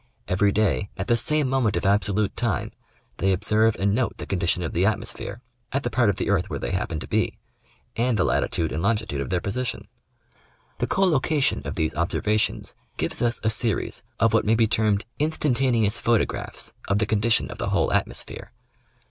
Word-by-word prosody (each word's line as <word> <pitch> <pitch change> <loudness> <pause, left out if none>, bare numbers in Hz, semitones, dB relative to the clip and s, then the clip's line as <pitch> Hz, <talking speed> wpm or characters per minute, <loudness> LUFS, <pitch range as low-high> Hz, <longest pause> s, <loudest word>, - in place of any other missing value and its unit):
Every 100 +2 +2
day, 100 -1 +1
at 95 - -2
the 120 - +3
same 150 +5 +2
moment 125 -5 +1
of - - -2
ab 100 +2 +4
solute 105 0 0
time, 115 -4 -1 0.5
they 95 - +2
observe 110 +4 +2
and 100 +1 +1
note 120 +2 0
the - - -6
condition 90 -2 0
of 80 - -4
the 90 - +1
atmosphere 110 +2 -2 0.3
at 140 +1 -1
the 120 - -2
part 120 -4 +3
of 100 - +1
the - - -3
earth 95 -3 +1
where - - -3
they - - -4
happen 90 -4 -2
to - - -7
be, - - 0 0.6
and 120 0 +1
the 95 - +3
latitude 80 -2 0
and 75 - -2
longitude 105 -8 0
of 70 - -4
their 90 - +1
position. 120 +8 -3 0.9
The - - 0
collocation 155 -6 +2
of - - -4
these 80 -4 0
observa 105 +6 0
tions - - -1 0.2
gives - - -2
us 120 -1 +1
a 110 - +3
series 110 -1 -1 0.2
of 115 0 +3
what 110 - +4
may 110 +2 +3
be 115 0 +4
termed 105 -1 +1
instantaneous 130 -7 +1
photographs 115 -2 0
of 100 - +2
the 105 - +1
condition 110 +2 +1
of - - -9
the - - -1
whole - - +1
atmosphere. - - -3
110 Hz, 195 wpm, -24 LUFS, 100-120 Hz, 0.9 s, ab